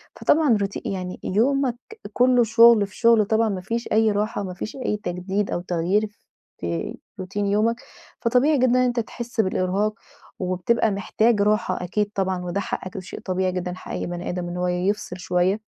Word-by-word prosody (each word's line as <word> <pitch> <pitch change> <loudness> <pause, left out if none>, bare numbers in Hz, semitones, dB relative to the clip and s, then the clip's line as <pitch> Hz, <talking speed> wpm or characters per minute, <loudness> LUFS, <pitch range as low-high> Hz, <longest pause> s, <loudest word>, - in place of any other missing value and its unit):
فطبعًا 295 -8 +3
روتي 200 0 -3
يعني 185 -1 -4
يومك 250 +4 +1 0.4
كُلّه 250 -1 +4
شغل 230 -2 +6
في 200 - -16
شغل 230 -2 +5
طبعًا 220 +1 +2
ما 190 -2 -3
فيش 230 +5 -3
أي 220 0 +4
راحة 210 +1 -1
وما 185 -2 -5
فيش 195 - -6
أي 210 - 0
تجديد 190 +1 -3
أو 175 - -1
تغيير 180 +4 0 0.5
في 85 -1 -3 0.2
روتين 195 +2 -3
يومك. 215 +3 +2 0.5
فطبيعي 255 +5 +3
جدًا 255 0 +3
إن 245 - +3
أنت 250 -1 +2
تحس 235 +1 -2
بالإرهاق 190 +2 0 0.5
وبتبقى 185 +5 +1
محتاج 210 +2 +1
راحة 210 -1 +1
أكيد 205 +3 -1
طبعًا 190 -2 -1
وده 175 +3 -2
حقك 190 - -4
وده - - -3
شيء - - -8
طبيعي 185 0 -1
جدًا. 180 0 -3
حق - - -10
أي - - -3
بني 175 0 -5
آدم 180 -1 -3
إن 175 +1 -5
هو 180 0 0
يفصل 180 +1 -1
شوية. 180 +3 +1
205 Hz, 180 wpm, -23 LUFS, 185-230 Hz, 0.5 s, شغل